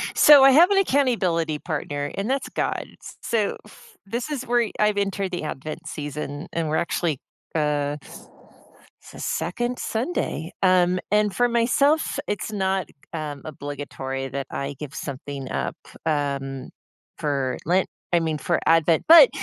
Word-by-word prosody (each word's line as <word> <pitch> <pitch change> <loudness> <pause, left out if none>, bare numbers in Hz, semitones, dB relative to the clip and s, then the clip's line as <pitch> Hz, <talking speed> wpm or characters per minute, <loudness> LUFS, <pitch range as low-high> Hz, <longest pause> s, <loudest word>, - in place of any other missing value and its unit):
So 290 -2 +9
I 270 - +8
have 330 +7 +7
an 400 - +4
accountability 200 - +2
partner, 145 -3 -3
and 200 +4 -2
that's 270 +1 -1
God. - - -2 0.2
S - - -11
so, 230 -5 0
f 455 -2 -17
this 235 +8 -3
is 275 -4 -3
where 240 -2 +2
I've 210 -1 +3
entered 195 -1 -1
the 175 - -3
advent 155 +3 -6
season, 145 0 -5
and 165 -2 -1
we're 155 - 0
actually, 165 -4 -1 0.4
uh 150 -1 0 1.0
se - - -13
second 240 +8 -2
Sunday, 220 - -2
um, 185 -1 +4
and 210 -1 +3
for 245 - +3
myself, 275 +6 +2
it's 205 +1 -3
not, 190 -3 0 0.3
um, 150 -3 -4
obligatory 140 -2 -5
that 135 +1 -4
I 140 +1 -4
give 150 -1 -7
something 140 -1 -6
up, - - -2 0.3
um, 140 -3 -2 0.5
for 135 -4 -1
Lent 180 +3 +2 0.3
I 175 - +5
mean, 160 -2 -1
for 170 +4 0
Advent, 165 0 +4
but 335 +9 +10
170 Hz, 150 wpm, -24 LUFS, 145-230 Hz, 1.0 s, but